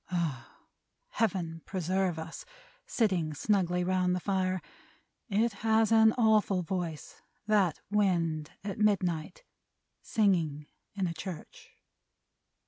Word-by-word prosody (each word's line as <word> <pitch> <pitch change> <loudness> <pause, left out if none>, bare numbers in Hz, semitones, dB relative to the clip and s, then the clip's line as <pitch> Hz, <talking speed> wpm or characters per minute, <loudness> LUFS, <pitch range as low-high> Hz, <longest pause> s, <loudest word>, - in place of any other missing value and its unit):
Ugh! 165 -9 -2 0.6
Heaven 175 -7 -1
preserve 185 -1 -1
us, 160 +1 -7 0.4
sitting 185 - 0
snugly 180 0 +1
round 180 0 +1
the - - -1
fire! 185 -1 0 0.7
It 220 +2 +1
has 220 0 +3
an 220 -1 +6
awful 215 -5 +3
voice, 170 -3 -5 0.2
that 205 -6 +2
wind 170 -7 +1
at 200 0 -5
midnight, 195 - 0 0.6
singing 165 -9 +1 0.3
in 195 -2 0
a 170 - -2
church! 170 0 -8
185 Hz, 105 wpm, -30 LUFS, 165-210 Hz, 0.7 s, an